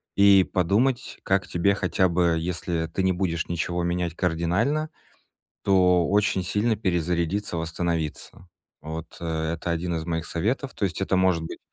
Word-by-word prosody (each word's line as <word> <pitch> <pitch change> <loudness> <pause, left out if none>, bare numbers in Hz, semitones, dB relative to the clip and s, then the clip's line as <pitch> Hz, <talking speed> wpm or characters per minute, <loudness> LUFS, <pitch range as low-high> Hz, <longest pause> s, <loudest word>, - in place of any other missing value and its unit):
и 100 -1 +7
подумать, 110 +10 0
как 95 -1 +1
тебе 95 +3 +2
хотя 95 -1 +1
бы, 85 -1 +2
если 85 -1 -2
ты 90 +4 -2
не 95 0 +3
будешь 85 -3 -1
ничего 85 +1 -1
менять 85 -1 -1
кардинально, 95 - 0 0.7
то 90 -3 +4
очень 100 -1 +2
сильно 105 +5 +1
перезарядиться, 90 0 -1
восстановиться. 85 +1 -3 0.3
Вот 80 +1 -6
это- 80 -1 -2
1 85 +1 -2
из 80 -1 -4
моих 80 -1 -2
советов. 120 - -2
То 100 - -1
есть 95 0 -3
это 95 - +1
может 95 -3 +2
быть, 80 - -7
90 Hz, 150 wpm, -25 LUFS, 85-95 Hz, 0.7 s, и